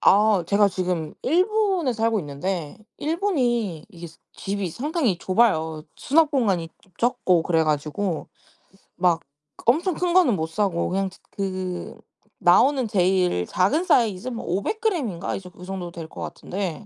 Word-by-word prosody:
아. 205 -3 +4
제가 205 +2 +4
지금 180 -4 -2
일본에 370 - +2
살고 225 -1 +1
있는데 150 +2 -4 0.2
일본이 250 - 0
이게 170 -4 -10
사 165 - -15 0.2
집이 195 -2 -3
상당히 265 - -1
좁아요. 160 -6 +1
수납 310 +2 +3
공간이 195 - +1
좀 190 - -27
적고 235 -8 +2
그래 165 -1 +2
가지고 155 +4 -2 0.7
막 175 -2 +2 0.4
엄청 330 +9 +3
큰 355 +1 -1
거는 350 - +5
못 160 -2 -2
사고 180 -1 0
그냥 190 +1 0
츠 190 - -18
그 185 -2 -4 0.4
나오는 270 -4 +4
제일 180 - +2
작은 200 - +1
사이즈 215 - +2
뭐 240 -2 -4
500 200 - -2
그램인가 275 - -1
이 - - -4
정 180 -1 -12
이 180 - -8
정도 185 -2 -5
될 165 -2 -8
거 - - -9
같은데. 180 -4 -5
195 Hz, 280 characters per minute, -24 LUFS, 175-250 Hz, 0.7 s, 거는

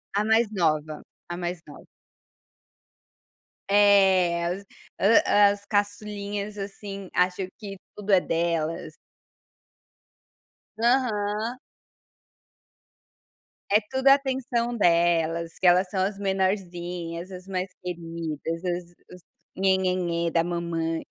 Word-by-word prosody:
A 205 - +2
mais 220 +2 +3
nova, 155 -5 0 0.3
a 175 - -4
mais 175 -1 -4
nova. 145 - -13 1.8
É, 190 -4 +4
as 180 +3 -2
o - - -31 0.6
as 205 0 +4
caçulinhas, 205 0 -2
assim, 195 -1 -7
acho 180 +1 +1
que 200 -2 -8 0.2
tudo 210 0 -4
é 190 - +7
delas. 165 -1 -2 1.8
Aham. 225 -1 0 2.1
É 210 - +6
tudo 265 +1 0
atenção 260 -3 +2
delas, 170 -3 +2
que 185 - +3
elas 180 +2 +5
são 190 - 0
as 195 +1 -2
menorzinhas, 180 -3 -2
as 185 0 -9
mais 185 -1 -3
queridas, 165 -2 -5
os 175 -1 -3 0.2
os 180 - -15 0.3
nhe-nhe-nhem 185 -3 +1
da 165 - +2
mamãe. 165 -1 -2
185 Hz, 100 wpm, -26 LUFS, 170-205 Hz, 2.1 s, é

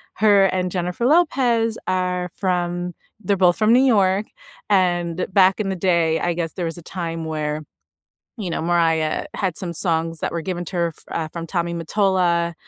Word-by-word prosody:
her 205 -2 +5
and 185 -1 -1
Jennifer 180 +5 -2
Lopez 245 -8 +2
are 180 -1 -1
from 175 -1 -2 0.3
they're 200 +1 0
both 180 -2 +4
from 220 +1 +4
New 255 +2 +5
York, 205 -5 +3 0.4
and 175 -3 +1
back 190 +1 +4
in 200 - -1
the 190 - -1
day, 170 -3 +2
I 175 - 0
guess 165 -1 -3
there 180 - -3
was 165 0 -4
a - - -9
time 165 -3 -5
where, 155 -1 -3 0.7
you 195 -6 -4
know, 165 - -2
Mariah 165 -2 +1
had 190 -5 -2
some 180 -4 -4
songs 165 -1 +1
that - - -2
were 170 - -1
given 175 +1 -4
to 185 - -7
her, 170 -1 0 0.2
uh, 160 -1 -3
from 165 -1 -5
Tommy 170 -1 -2
Mottola, 170 -1 +1
180 Hz, 180 wpm, -21 LUFS, 170-195 Hz, 0.7 s, her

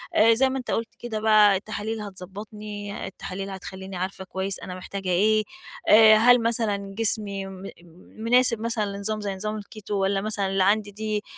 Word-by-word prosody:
آآ، 230 +1 +6
زي 265 +3 +3
ما 265 - -2
أنت 250 - -5
قُلت 225 0 -2
كده 230 -3 -4
بقى 215 -2 +5
التحاليل 215 +2 -4
هتضبّطني، 205 +1 -7
التحاليل 195 +1 -6
هتخلّيني 190 0 -8
عارفة 190 +1 -4
كويس 190 +1 -3
أنا 180 - -7
محتاجة 190 +1 -6
إيه. 215 +4 +3 0.5
آآ، 215 0 +8
هل 245 +2 +6
مثلًا 205 -4 -1
جسمي 200 -3 0
م 190 0 -9 0.5
مناسب 230 0 +3
مثلًا 230 -2 -1
لنظام 215 +1 -3
زي 200 -2 -3
نظام 215 +2 -4
الكيتو 210 0 -7
والّا 195 0 +1
مثلًا 210 -2 -1
اللي 190 0 +1
عندي 205 +1 +2
دي 215 +1 -3
210 Hz, 170 wpm, -25 LUFS, 195-220 Hz, 0.5 s, آآ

